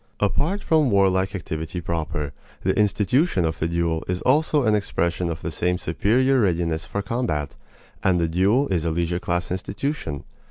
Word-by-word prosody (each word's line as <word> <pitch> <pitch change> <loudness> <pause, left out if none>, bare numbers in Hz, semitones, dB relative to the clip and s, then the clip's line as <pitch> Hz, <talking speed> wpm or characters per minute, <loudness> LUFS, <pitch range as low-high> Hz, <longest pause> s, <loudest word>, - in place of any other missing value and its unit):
Apart 150 - 0
from 155 -4 +3
warlike 95 -1 +2
activity 80 -1 -4
proper, 80 -4 -3 0.3
the - - +1
institution 105 - +2
of 80 0 -2
the 80 - 0
duel 85 -1 0
is 90 0 -2
also 150 +1 +3
an 110 - +3
expression 90 -4 0
of 80 - -5
the - - -3
same 90 +1 0
superior 125 +11 +2
readiness 85 -6 0
for 100 - -3
combat; 95 - -2 0.5
and 90 -2 +2
the 85 - +1
duel 100 - +2
is 85 -4 0
a 85 - 0
leisure 85 +2 -1
class 85 -1 -2
institution. 95 - -3
90 Hz, 165 wpm, -23 LUFS, 85-110 Hz, 0.5 s, from